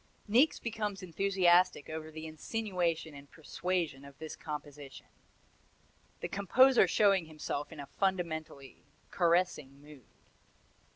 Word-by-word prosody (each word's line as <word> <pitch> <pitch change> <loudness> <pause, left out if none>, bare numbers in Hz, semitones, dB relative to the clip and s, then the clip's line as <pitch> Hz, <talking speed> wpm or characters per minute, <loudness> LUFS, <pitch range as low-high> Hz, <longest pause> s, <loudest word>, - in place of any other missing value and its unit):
Niecks 250 +9 +4
becomes 210 -4 -4
enthusiastic 180 -3 +2
over 155 0 -6
the 155 0 -8
insinuation 170 -1 -2
and 140 0 -13
persuasion 165 -3 -3
of 140 -1 -13
this 160 0 -7
composition: 145 -2 -8 1.2
"the - - -2
composer 255 +7 +4
showing 195 -5 +3
himself 150 -2 -5
in 160 - -10
a 140 - -6
fundamentally 160 -5 -3 0.3
caressing 170 -6 +1
mood." 145 -4 -15
165 Hz, 110 wpm, -32 LUFS, 150-190 Hz, 1.2 s, Niecks